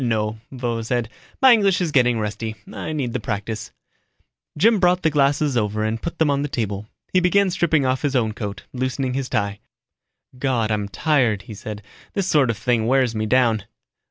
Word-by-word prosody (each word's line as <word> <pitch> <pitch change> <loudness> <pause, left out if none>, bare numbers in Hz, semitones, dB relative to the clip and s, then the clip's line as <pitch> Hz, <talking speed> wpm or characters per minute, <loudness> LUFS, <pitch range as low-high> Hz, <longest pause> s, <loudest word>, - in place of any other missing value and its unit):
"No," 110 -2 -1
Vovo 120 -3 -2
said, 120 -1 -1 0.3
"my 260 -2 +9
English 200 -5 +3
is 175 -4 -1
getting 125 -4 +3
rusty. 110 +1 -3 0.2
I - - -5
need 135 -6 -2
the - - -1
practice." 110 +1 -4 0.9
Jim 220 +5 +4
brought 180 0 +3
the 160 - +3
glasses 145 -1 +2
over 110 -2 0
and 110 +1 -2
put 170 0 -5
them 155 -3 +3
on 140 0 +1
the 145 - -1
table. 105 -6 -3 0.3
He 185 - +5
began 185 +2 +3
stripping 165 -6 +2
off 130 0 0
his 145 -2 -1
own 115 -4 +2
coat, 105 -2 -6
loosening 130 0 -2
his 135 -1 -3
tie. 100 0 -1 0.8
"God, 120 -5 0
I'm 105 -1 -1
tired," 125 -6 +1
he 110 - -9
said. 105 0 -7 0.3
"This 195 - -1
sort 145 -8 +3
of 115 - -1
thing 115 +1 +1
wears 130 -2 +3
me 110 -1 -2
down." 115 -4 +2
125 Hz, 190 wpm, -22 LUFS, 110-145 Hz, 0.9 s, my